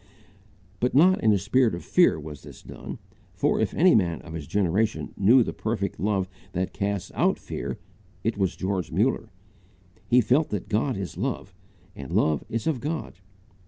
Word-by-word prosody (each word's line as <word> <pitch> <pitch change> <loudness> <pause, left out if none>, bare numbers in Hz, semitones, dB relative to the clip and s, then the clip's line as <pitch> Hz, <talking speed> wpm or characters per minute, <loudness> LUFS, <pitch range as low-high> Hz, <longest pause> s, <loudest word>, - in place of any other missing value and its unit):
But 125 +4 0
not 185 +6 +5
in 110 - +5
a 105 - +4
spirit 110 +3 +2
of 85 - -9
fear 175 - +4
was 75 -1 -9
this - - -13
done; - - -8 0.4
for - - +1
if - - +1
any 180 +3 +5
man 85 -6 +2
of 85 - -10
his 80 -3 -6
generation 100 +3 0
knew 115 +6 +5
the - - -4
perfect 110 -3 -3
love 100 -2 0 0.3
that 90 0 -2
casts 100 -2 -2
out - - +2
fear, - - -5 0.5
it 115 +1 0
was 95 -3 0
George 95 -3 -2
Muller. 110 +5 +1 0.8
He 125 - +5
felt 130 +7 +2
that 105 -3 -4
God 115 +4 0
is 95 -3 -5
love, 110 -3 -3 0.4
and 65 -2 -8
love 75 -2 +2
is 115 0 -3
of 155 -6 0
God. 150 - -4
105 Hz, 175 wpm, -26 LUFS, 90-125 Hz, 0.8 s, not